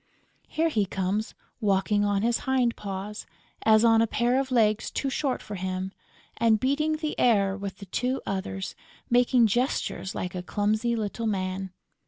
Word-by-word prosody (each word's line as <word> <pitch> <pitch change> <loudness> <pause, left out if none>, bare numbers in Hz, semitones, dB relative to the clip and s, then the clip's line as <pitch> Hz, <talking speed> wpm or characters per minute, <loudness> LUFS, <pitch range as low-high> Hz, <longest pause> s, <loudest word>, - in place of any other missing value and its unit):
Here 325 +1 +1
he 210 -10 +1
comes 195 +4 -2 0.2
walking 205 -1 +2
on 205 0 +1
his 235 0 +2
hind 255 -3 +1
paws, 200 +1 -6 0.4
as 220 +1 +5
on 225 -1 +5
a 230 - +3
pair 240 +4 +1
of 270 -1 -2
legs 220 -4 +2
too 275 - -2
short 265 0 -1
for 210 - -8
him, 185 0 -3 0.5
and 225 -2 +3
beating 290 +5 +1
the 310 -1 -3
air 200 -5 +3
with 195 -1 -6
the 200 - -9
two 250 +7 -1
others, 190 -1 -3 0.4
making 245 0 +5
gestures 230 -3 -1
like 180 - -3
a 180 - -3
clumsy 215 +5 0
little 225 +1 -2
man. 190 -2 -2
215 Hz, 165 wpm, -27 LUFS, 195-245 Hz, 0.5 s, as